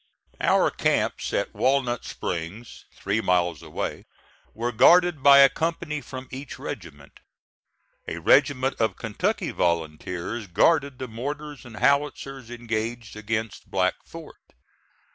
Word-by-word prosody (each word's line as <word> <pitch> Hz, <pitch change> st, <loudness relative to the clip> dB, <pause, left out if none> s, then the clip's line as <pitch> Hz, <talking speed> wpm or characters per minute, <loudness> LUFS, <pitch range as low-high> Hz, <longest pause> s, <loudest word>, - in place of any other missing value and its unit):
Our -, -, +3 dB
camps -, -, 0 dB
at -, -, -1 dB
Walnut 130 Hz, -3 st, +1 dB
Springs, 90 Hz, +8 st, -6 dB
three 100 Hz, +3 st, -2 dB
miles 90 Hz, -5 st, +1 dB
away, -, -, -5 dB, 0.5 s
were 120 Hz, +2 st, -2 dB
guarded 170 Hz, +6 st, +5 dB
by 140 Hz, 0 st, +8 dB
a 135 Hz, -, +9 dB
company 160 Hz, -1 st, -3 dB
from 130 Hz, -1 st, -8 dB
each 135 Hz, +2 st, -7 dB
regiment. 85 Hz, -, -9 dB, 0.9 s
A -, -, -4 dB
regiment 135 Hz, -2 st, +3 dB
of 110 Hz, -, +1 dB
Kentucky 110 Hz, -2 st, -2 dB
volunteers 85 Hz, +6 st, -2 dB
guarded 135 Hz, -, +2 dB
the 130 Hz, -, -5 dB
mortars 145 Hz, +5 st, -6 dB
and 120 Hz, -2 st, -11 dB
howitzers 135 Hz, -2 st, 0 dB
engaged 115 Hz, -1 st, -4 dB
against 110 Hz, 0 st, -4 dB
Black -, -, +2 dB
Fort. -, -, -13 dB
120 Hz, 120 wpm, -25 LUFS, 105-140 Hz, 0.9 s, a